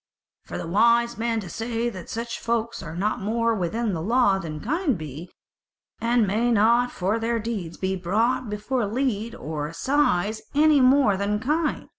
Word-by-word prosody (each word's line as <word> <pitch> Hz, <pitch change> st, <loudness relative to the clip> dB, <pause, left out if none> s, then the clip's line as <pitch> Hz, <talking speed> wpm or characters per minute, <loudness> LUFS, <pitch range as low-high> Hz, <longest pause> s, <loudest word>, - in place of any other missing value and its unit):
For -, -, -6 dB
the -, -, -5 dB
wise 235 Hz, +6 st, +3 dB
men 230 Hz, -1 st, 0 dB
say 230 Hz, +5 st, -3 dB
that 190 Hz, -7 st, -7 dB
such 230 Hz, +1 st, -4 dB
folk 230 Hz, 0 st, -1 dB
are 160 Hz, -, -7 dB
no 205 Hz, +5 st, 0 dB
more 230 Hz, +3 st, 0 dB
within 220 Hz, +3 st, -1 dB
the 165 Hz, -, -3 dB
law 205 Hz, 0 st, +3 dB
than 155 Hz, -4 st, -6 dB
kine 295 Hz, -, 0 dB
be, 155 Hz, +1 st, -8 dB, 0.7 s
and 235 Hz, -1 st, +2 dB
may 220 Hz, +5 st, +1 dB
not 235 Hz, +3 st, +3 dB
for 195 Hz, +5 st, -1 dB
their 230 Hz, +1 st, 0 dB
deeds 210 Hz, -7 st, -4 dB
be 190 Hz, 0 st, -1 dB
brought 215 Hz, +7 st, 0 dB
before 210 Hz, +3 st, -2 dB
leet 230 Hz, -1 st, -2 dB
or 150 Hz, -1 st, -4 dB
assize 215 Hz, -, 0 dB
any 300 Hz, -1 st, +5 dB
more 255 Hz, -6 st, +4 dB
than 205 Hz, +1 st, -1 dB
kine. 300 Hz, +6 st, -1 dB
225 Hz, 165 wpm, -24 LUFS, 195-240 Hz, 0.7 s, any